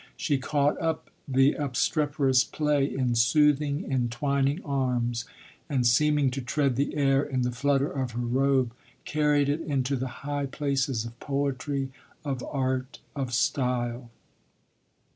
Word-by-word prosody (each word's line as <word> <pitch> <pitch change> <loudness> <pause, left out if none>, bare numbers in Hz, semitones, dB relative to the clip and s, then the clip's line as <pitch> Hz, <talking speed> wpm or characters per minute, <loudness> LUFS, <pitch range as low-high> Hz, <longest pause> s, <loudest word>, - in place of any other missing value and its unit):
She 145 -4 0
caught 145 +2 0
up 160 -1 -2 0.2
the 135 +1 +4
obstreperous 140 -1 +1
play 150 -2 +1
in 125 -2 0
soothing, 145 +5 +3
entwining 135 +4 0
arms 125 -4 -1 0.4
and, 130 -4 +1
seeming 145 +2 +3
to 135 +1 -3
tread 135 +1 0
the 140 +3 -1
air 135 -1 +3
in 130 -3 -1
the 125 - 0
flutter 140 +3 +1
of 130 -3 -3
her 120 +1 -2
robe, 130 0 +2 0.3
carried 150 -2 +2
it 145 +3 0
into 140 -3 -1
the 130 0 -2 0.2
high 145 -1 -1
places 135 -4 -1
of 115 +1 -10
poetry, 140 -1 -2 0.3
of 135 -3 -3
art, 130 -1 -2 0.2
of 135 -3 -3
style. 125 -2 0
135 Hz, 135 wpm, -27 LUFS, 125-145 Hz, 0.4 s, the